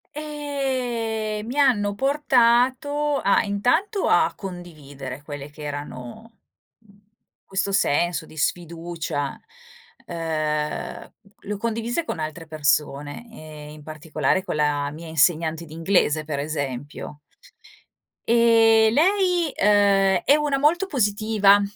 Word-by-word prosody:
E 255 -8 -3
mi 245 +5 -5
hanno 210 -8 +3
portato, 275 +2 +2
a 200 - +4
intanto, 315 - +1
a - - +3
condividere 145 -8 -8
quelle 145 -1 -8
che 150 +1 -14
erano, 145 - -8 0.4
mhmm, 210 -3 -23 0.5
questo 195 +1 -2
senso 175 -2 +1
di 155 - -15
sfiducia. 165 -2 -3 0.7
Uhm, 155 -3 -3 0.3
l'ho 210 +1 -4
condivise 230 +7 -2
con 235 - -5
altre 155 +2 -5
persone 150 +4 -1
e 155 -7 -11
in 150 0 -12
particolare 155 +2 -1
con 200 - -4
la 145 -1 0
mia 165 +3 -9
insegnante 160 +1 +1
di 160 - -13
inglese, 160 -2 +1
per 150 -2 -3
esempio. 145 -1 -5 1.1
E 225 -1 +5
lei 355 - +2
uhm, 195 -2 +4
è 285 - +5
una 295 -2 0
molto 325 +7 +3
positiva. 210 - +3
195 Hz, 110 wpm, -23 LUFS, 155-235 Hz, 1.1 s, E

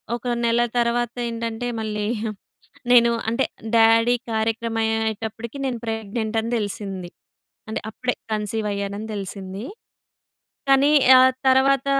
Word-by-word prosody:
ఒక 240 - -10 0.2
నెల 235 +1 +3 0.2
తర్వాత 240 0 0 0.2
ఏంటంటే, 230 +1 -4
మళ్ళీ 210 -1 -3 0.9
నేను 235 -1 +6 0.2
అంటే 235 +4 +1 0.3
డ్యాడీ 230 +2 +5 0.2
కార్యక్రమం 225 +1 -1
అయ్యేటప్పటికి 225 +2 -2
నేను 250 -3 -2
ప్రెగ్నెంట్ 220 0 -3
అని 230 +2 -4
తెలిసింది. 195 -3 -4 0.6
అంటే, 220 - -2
అప్పుడే 250 +3 -2 0.2
కన్సీవ్ 210 0 -2
అయ్యానని 200 +2 -4
తెలిసింది. 195 +1 -6 1.1
కానీ 275 +2 +5 0.3
ఆ - - +8 0.3
తర్వాత, 265 +1 +3
225 Hz, 110 wpm, -23 LUFS, 215-235 Hz, 1.1 s, ఆ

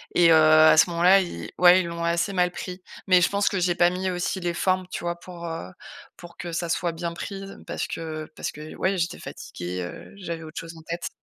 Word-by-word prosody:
et 170 -1 +6
heu, - - +8
à 155 0 +7
ce 165 - +6
moment-là 175 +3 +5
ils 130 - -5
ouais, 180 +1 +7
ils 180 - -4
l'ont 170 0 -4
assez 170 +4 0
mal 180 -2 +2
pris. 180 +1 -7 0.3
Mais 185 -1 +6
je 180 - +5
pense 200 0 +1
que 200 - -1
j'ai 175 -1 +1
pas 175 0 +4
mis 185 +1 -2
aussi 180 +1 -2
les 175 -1 -2
formes, 185 +1 0
tu - - -6
vois 170 0 -3
pour, 175 -1 -9
heu, 165 - -5 0.5
pour 175 -1 -13
que 175 -1 -6
ça 170 0 -2
soit 170 +1 0
bien 170 +1 -4
pris. 195 +3 -6 0.2
Parce - - -3
que 155 -1 -6
parce - - -4
que 155 +1 -9
ouais, 190 0 0
j'étais 170 0 -2
fatiguée, 90 +1 -6
heu, 85 - -9
j'avais 170 -4 -6
autre 155 -1 -7
chose 165 0 -10
en - - -12
tête. 170 +2 -4
170 Hz, 240 wpm, -25 LUFS, 165-180 Hz, 0.5 s, heu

